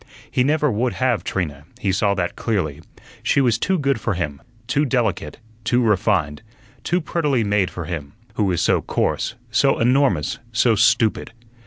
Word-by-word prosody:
He 125 - +2
never 150 +1 +2
would 120 +3 0
have 130 -4 0
Trina, 75 -6 -3
he 100 - 0
saw 100 +1 +1
that 90 -2 -2
clearly. 90 - -2 0.4
She - - +2
was 120 -5 +2
too 190 - +1
good 140 -5 0
for 110 - -1
him; 75 -5 -4 0.2
too 140 +4 +1
delicate, 115 - -1 0.3
too 120 +2 +2
refined, 95 -8 +1 0.4
too 175 - +1
prettily 150 -7 0
made 100 -3 +1
for 85 -2 -6
him, 75 -4 -6 0.2
who 105 - 0
was 90 -4 0
so - - +3
coarse, - - -1 0.2
so 135 +4 +3
enormous, 125 - +2
so 115 +1 +3
stupid. 110 +1 +2
110 Hz, 165 wpm, -21 LUFS, 90-130 Hz, 0.4 s, so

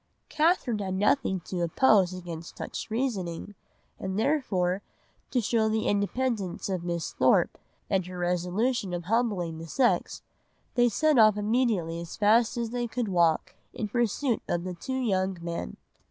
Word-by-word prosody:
"Catherine 305 - +2
had 190 -2 -2
nothing 195 -1 +1
to 180 +1 -4
oppose 190 +2 +4
against 170 -2 -8
such - - -5
reasoning, 205 -7 -2 0.5
and 190 0 -3
therefore 205 -9 +1 0.5
to 255 - +1
show 220 0 +1
the 220 0 0
independence 205 -2 -1
of 185 -3 -2
Miss 170 -1 -3
Thorpe - - +3 0.3
and 190 -2 +1
her 180 0 -7
resolution 180 +4 0
of 175 - -4
humbling 190 -6 0
the 165 - -8
sex, 250 - +1 0.5
they 245 -1 +4
set 295 +5 +3
off 215 -1 +6
immediately 210 -7 0
as 170 - -8
fast 225 +3 +3
as 230 -1 -2
they 240 -1 -2
could 235 -1 -2
walk 170 -4 +2 0.2
in 215 - -2
pursuit 240 +2 0
of 175 0 0
the 185 0 -4
two 260 +10 -4
young 190 -6 0
men." 170 - -5
205 Hz, 155 wpm, -28 LUFS, 180-240 Hz, 0.5 s, off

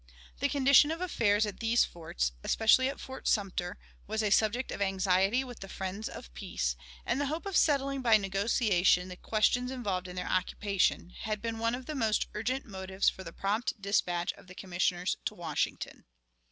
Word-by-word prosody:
The - - +1
condition 280 +1 +5
of 325 +1 -2
affairs 220 - +2
at 205 -2 -6
these 230 +1 +3
forts 60 - -3
especially 260 +4 +4
at 275 - -6
Fort 265 0 -7
Sumter 185 -4 0 0.3
was 220 +1 -1
a 210 - +1
subject 225 +5 +2
of - - -5
anxiety 195 +4 +2
with 245 -2 -9
the 195 - -9
friends 190 +4 -4
of - - -10
peace, 60 0 -2 0.3
and 275 - 0
the 285 - 0
hope 315 +6 -3
of 395 -2 -3
settling 275 -4 +2
by 230 -3 +6
negotiation 195 -2 +2
the 180 - -7
questions 225 +6 +1
involved 200 -8 -3
in 180 - -8
their 180 - -3
occupation 185 -1 0
had 215 -2 -2
been 225 +1 -4
one 230 +1 +1
of 255 0 -8
the 305 - -5
most 225 -7 +1
urgent 245 +6 -2
motives 190 -2 0
for 190 - -9
the 165 - -8
prompt 210 +6 -2
dispatch 180 -3 0
of - - -18
the 185 - -12
Commissioners 180 -1 -1
to - - -2
Washington. - - -3
210 Hz, 185 wpm, -30 LUFS, 185-245 Hz, 0.3 s, by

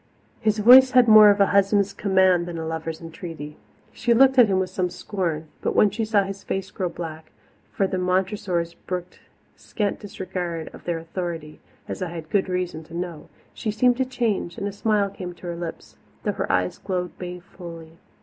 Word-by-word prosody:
His 215 0 +1
voice 255 +4 +8
had 250 -2 +6
more 215 -1 +9
of 205 0 +3
a 200 - +6
husband's 200 0 +3
command 190 -3 +3
than 170 -1 -5
a 160 - -4
lover's 160 0 -4
entreaty. 165 -2 -8 0.4
She 240 -1 +1
looked 265 +2 +5
at 240 - +8
him 195 -2 +1
with 190 -1 -1
some 180 -1 -1
scorn, 170 -6 -3 0.2
but - - -1
when 210 - +5
she 225 +2 -2
saw 210 -2 +3
his 195 0 -7
face 195 0 -4
grow 185 -3 -2
black 160 -2 -8 0.4
for 195 - +1
the 190 0 -2
Montressors 180 -2 -1
brooked 180 -1 -5 0.4
scant 205 -3 -3
disregard 180 -5 -5
of - - -13
their 175 -1 -1
authority, 165 -2 -6 0.3
as - - -6
I 180 - -2
had 165 -2 -8
good 195 -2 +1
reason 180 -3 -3
to 165 - -11
know 175 -3 -6 0.2
she 220 - -4
seemed 245 +3 +3
to 260 - +1
change, 230 -9 -2
and 200 - -3
a - - -3
smile 205 -1 0
came 180 -2 -7
to 175 - -13
her 175 -1 -4
lips, 170 -1 -8 0.3
though - - +1
her - - -2
eyes 90 0 0
glowed 180 -2 -3
balefully. 175 -2 -9
185 Hz, 195 wpm, -24 LUFS, 170-205 Hz, 0.4 s, more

